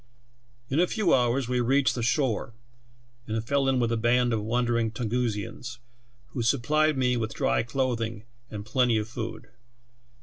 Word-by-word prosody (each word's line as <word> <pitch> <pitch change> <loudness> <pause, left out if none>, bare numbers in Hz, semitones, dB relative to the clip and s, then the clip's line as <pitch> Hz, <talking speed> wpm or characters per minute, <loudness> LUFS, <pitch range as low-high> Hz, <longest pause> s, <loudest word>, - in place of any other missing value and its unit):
In 135 +5 0
a 180 - +4
few 205 -3 +1
hours 125 0 +2
we 125 0 +1
reached 135 +3 +3
the 120 - -3
shore 120 -2 0 0.7
and 110 0 -2
fell 140 0 +2
in 130 -1 +2
with 120 -1 +1
a 115 - +1
band 120 +1 +2
of 110 - 0
wandering 115 +1 +1
Tungusians, 115 0 -3 0.5
who 120 - -4
supplied 150 +6 +2
me 125 -1 +2
with 110 -1 -3
dry - - +1
clothing 115 -3 -2 0.3
and 105 -1 -7
plenty 120 0 +2
of 105 0 -2
food. 115 0 -6
120 Hz, 160 wpm, -27 LUFS, 115-130 Hz, 0.7 s, a